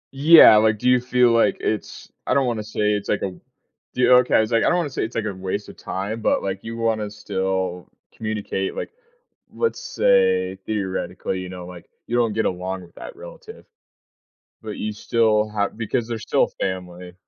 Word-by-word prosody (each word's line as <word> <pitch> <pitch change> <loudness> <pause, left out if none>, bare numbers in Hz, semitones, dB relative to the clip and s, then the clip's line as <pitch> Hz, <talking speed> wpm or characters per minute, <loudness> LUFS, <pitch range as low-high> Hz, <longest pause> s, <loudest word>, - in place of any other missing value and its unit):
Yeah, 150 -6 +8
like, 110 0 +3
do 125 - -2
you 125 -1 +4
feel 125 -1 +3
like 115 0 +3
it's 110 - -4 0.2
I 130 - +2
don't 140 - +3
wanna 120 -3 -1
say 105 -1 -1
it's 105 -1 -3
like - - 0
a 95 - -2 0.6
Do 125 - -1
you? 125 - +5
Okay, 125 - +2
I - - +6
was 110 +2 -3
like 115 - +3
I - - +2
don't 175 - +2
wanna 165 -5 -2
say - - -2
it's 115 - -5
like 115 - -1
a 100 - -3
waste 95 +2 -4
of - - -11
time, 105 +4 -5
but, - - +1
like, 95 0 -4
you 115 0 -6
wanna 110 -2 -1
still 95 -3 -3 0.3
communicate. 105 -3 -3
Like, - - -5 0.6
let's 460 -1 -1
say, 480 -2 +2
theoretically, 95 -2 -3
you 90 - -7
know, 90 -1 -8
like, 90 -1 -12 0.2
you 120 - -2
don't 115 -3 +2
get 110 - 0
along 95 +1 -3
with 85 - -17
that - - -9
relative, 470 -1 -12 1.0
but 110 -2 -7
you 105 0 -3
still 110 0 +1
ha 100 -1 0
because 115 +1 -3
they're 115 -1 -3
still - - +1
family. 90 -1 -5
110 Hz, 200 wpm, -22 LUFS, 95-120 Hz, 1.0 s, Yeah